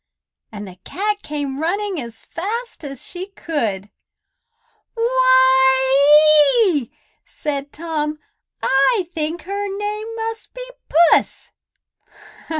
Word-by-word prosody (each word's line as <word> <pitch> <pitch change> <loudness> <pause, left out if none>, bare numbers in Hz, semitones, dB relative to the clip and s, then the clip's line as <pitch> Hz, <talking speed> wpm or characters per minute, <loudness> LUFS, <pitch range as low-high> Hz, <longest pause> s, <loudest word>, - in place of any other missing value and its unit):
and 205 -2 -8
the 185 -1 -12
cat 415 +2 -2
came 285 -2 -5
running 380 +1 -2
as 235 -2 -11
fast 450 +5 -5
as 275 -3 -7
she 365 +1 -6
could. 230 - -4 1.0
"Why 290 - +5
ee!" 290 - -1 0.3
said 285 -1 -5
Tom. 305 -2 -3 0.5
"I 345 - +2
think 320 +2 -3
her 400 +1 -4
name 420 +1 -4
must 450 0 -6
be - - -7 0.2
Puss." 335 +2 +3
315 Hz, 100 wpm, -20 LUFS, 275-410 Hz, 1.0 s, Why